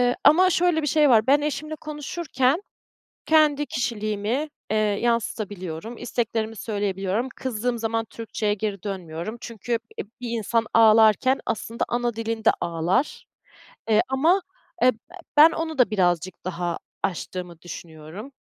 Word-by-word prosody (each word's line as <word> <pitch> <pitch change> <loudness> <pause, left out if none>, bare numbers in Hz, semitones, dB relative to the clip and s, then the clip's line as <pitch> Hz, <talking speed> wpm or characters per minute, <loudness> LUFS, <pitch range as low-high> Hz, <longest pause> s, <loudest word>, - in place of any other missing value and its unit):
Eee, 245 0 +2
ama 370 +4 +6
şöyle 345 -2 +2
bir 295 - -1
şey 300 0 +4
var, 220 -3 +5
ben 280 +2 +5
eşimle 300 +1 -3
konuşurken 300 0 -1 0.6
kendi 300 -2 +4
kişiliğimi, 225 +4 -2 0.2
eee, 215 - +1
yansıtabiliyorum, 210 -3 -1
isteklerimi 225 -2 -2
söyleyebiliyorum, 200 +2 -2
kızdığım 245 -1 -2
zaman 225 0 -1
Türkçe'ye 220 -1 -3
geri 205 -2 -4
dönmüyorum. 185 +1 -5
Çünkü, 230 -1 -6 0.3
eee, - - -2 0.2
bir 240 -2 -4
insan 230 0 0
ağlarken 225 +3 +5
aslında 225 +2 -2
ana 240 -1 -1
dilinde 225 0 +1
ağlar, 175 - -1 0.7
eee, 215 0 +5
ama, 320 +9 +3 0.4
eee, 255 - +7
b - - -22 0.4
ben 315 +2 +9
onu 320 -2 -3
da 250 - +4
birazcık 180 -3 0
daha 175 -1 -2 0.3
aştığımı 180 -2 -4
düşünüyorum, 170 - -9
225 Hz, 130 wpm, -24 LUFS, 200-265 Hz, 0.7 s, ben